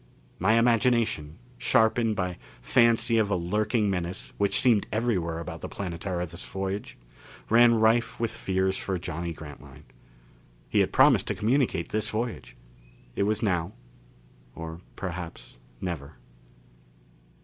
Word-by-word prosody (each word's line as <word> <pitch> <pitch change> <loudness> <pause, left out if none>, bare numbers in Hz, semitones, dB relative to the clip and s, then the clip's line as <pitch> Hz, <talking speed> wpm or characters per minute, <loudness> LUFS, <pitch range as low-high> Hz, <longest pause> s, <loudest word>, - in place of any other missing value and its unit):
My 105 +5 +3
imagination, 115 -9 +2 0.2
sharpened 110 0 +3
by 90 -2 -3 0.2
fancy 115 - +3
of 105 -2 +1
a 100 - +1
lurking 105 +5 0
menace 90 -2 -3
which 100 -1 +3
seemed 115 -5 +3
everywhere 95 -8 0
about 85 - -7
the - - -6
Planetara 90 -1 -4
this 85 +1 -8
voyage, 95 +1 -4 0.5
ran 120 +1 +7
rife 115 +1 +2
with 115 -1 0
fears 95 0 -1
for 95 -1 -2
Johnny 85 0 -4
Grantline. 75 -2 -11 0.8
He - - +1
had - - +2
promised - - +5
to - - -1
communicate 115 -6 +1
this 110 0 -1
voyage. 110 - -4 0.6
It - - +1
was 110 +1 0
now, 90 -2 0 0.8
or 80 +1 -7
perhaps 90 -8 -7 0.2
never. 75 -4 -5
95 Hz, 125 wpm, -27 LUFS, 85-115 Hz, 0.8 s, ran